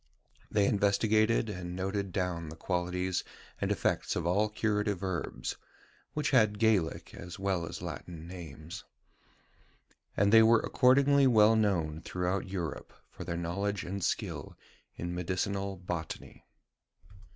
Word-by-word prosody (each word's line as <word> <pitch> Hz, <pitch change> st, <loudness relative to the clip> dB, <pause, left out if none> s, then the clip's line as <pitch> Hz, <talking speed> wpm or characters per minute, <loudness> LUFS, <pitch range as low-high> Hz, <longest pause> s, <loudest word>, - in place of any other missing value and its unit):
They 105 Hz, -2 st, +3 dB
investigated 110 Hz, +3 st, +3 dB
and 90 Hz, -4 st, -5 dB
noted 95 Hz, +1 st, -2 dB
down 90 Hz, -3 st, -2 dB
the 80 Hz, -, -8 dB
qualities 90 Hz, +1 st, -1 dB, 0.4 s
and -, -, 0 dB
effects -, -, 0 dB
of -, -, -2 dB
all 100 Hz, +5 st, +2 dB
curative 105 Hz, -2 st, 0 dB
herbs 95 Hz, -3 st, -3 dB, 0.6 s
(which 150 Hz, -2 st, 0 dB
had 110 Hz, -6 st, +4 dB
Gaelic, 105 Hz, -7 st, +1 dB
as 90 Hz, -1 st, -8 dB
well 95 Hz, -4 st, -1 dB
as -, -, -7 dB
Latin, 85 Hz, -2 st, -7 dB
names); 80 Hz, -3 st, -8 dB, 1.3 s
and 100 Hz, +2 st, +3 dB
they 115 Hz, -, +10 dB
were 115 Hz, 0 st, +6 dB
accordingly 140 Hz, +2 st, +4 dB
well 110 Hz, -2 st, +6 dB
known 85 Hz, -8 st, +1 dB
throughout 90 Hz, +2 st, -2 dB
Europe 85 Hz, -6 st, -4 dB, 0.2 s
for -, -, -8 dB
their 85 Hz, -, -3 dB
knowledge 100 Hz, +4 st, -2 dB
and 95 Hz, +1 st, -4 dB
skill -, -, -2 dB, 0.4 s
in 85 Hz, +1 st, -4 dB
medicinal 95 Hz, +2 st, -2 dB
botany. 85 Hz, -2 st, -6 dB
95 Hz, 130 wpm, -31 LUFS, 90-105 Hz, 1.3 s, they